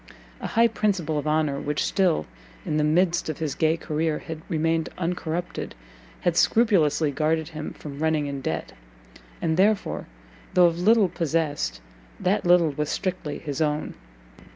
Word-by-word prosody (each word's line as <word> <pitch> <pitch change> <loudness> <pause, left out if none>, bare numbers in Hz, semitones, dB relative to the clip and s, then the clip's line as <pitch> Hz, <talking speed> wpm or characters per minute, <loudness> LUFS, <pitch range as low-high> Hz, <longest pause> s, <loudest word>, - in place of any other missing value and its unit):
A - - -4
high 230 0 +4
principle 190 -9 0
of 145 - -4
honour 150 -2 +1
which 150 0 -1
still, 185 -4 +2 0.4
in 150 - -1
the 150 - +2
midst 170 +2 +2
of 155 - -3
his 155 -3 -2
gay 160 0 +2
career, 155 -1 -1
had 160 -1 -7
remained 165 0 0
uncorrupted, 175 - -3 0.5
had 175 -2 +1
scrupulously 165 -9 +3
guarded 155 +2 0
him 155 -1 -6
from 140 -2 -9
running 160 -1 +1
in 140 -1 -4
debt, - - -3 0.7
and 160 0 +1
therefore, 205 +2 +1 0.5
though 180 - +7
of 170 0 +2
little 215 +2 +5
possessed, 155 - -1 0.4
that 195 +2 +1
little 175 -3 +5
was 150 +1 -3
strictly 180 -6 -3
his 145 -1 -4
own. 150 0 0
160 Hz, 150 wpm, -25 LUFS, 150-175 Hz, 0.7 s, though